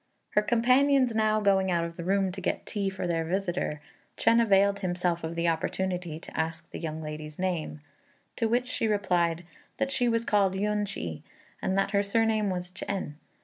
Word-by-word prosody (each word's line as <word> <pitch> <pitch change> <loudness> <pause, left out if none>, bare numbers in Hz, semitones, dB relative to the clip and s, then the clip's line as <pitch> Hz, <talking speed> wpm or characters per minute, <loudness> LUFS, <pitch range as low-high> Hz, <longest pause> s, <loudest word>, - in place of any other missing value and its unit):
Her 210 - +4
companions 255 +3 +3
now 215 -1 +2
going 195 -2 +3
out 170 -2 +1
of 170 0 -7
the 170 - -6
room 195 +1 +1
to 190 +1 -7
get - - -2
tea 200 -2 -1
for 190 -1 -4
their 165 -2 0
visitor, 175 -3 -2 0.4
Chên 230 +1 +4
availed 200 -2 +4
himself 175 -2 -1
of 160 +1 -4
the 170 0 0
opportunity 175 0 -1
to - - -11
ask 160 +1 -2
the - - -6
young 160 -1 -4
lady's 150 0 -7
name; 170 -5 -2 0.6
to 230 - +1
which 240 +2 +1
she 250 -2 -1
replied 175 -5 +1 0.3
that 275 0 -1
she 245 -3 +2
was 230 0 +1
called 195 -3 +2
Yün 210 +1 0
ch'i, 85 - -5 0.4
and 190 - 0
that 195 - +1
her 200 -1 +3
surname 215 0 +1
was 180 -1 -4
Ch'ên. 190 -4 -4
190 Hz, 190 wpm, -28 LUFS, 170-215 Hz, 0.6 s, Her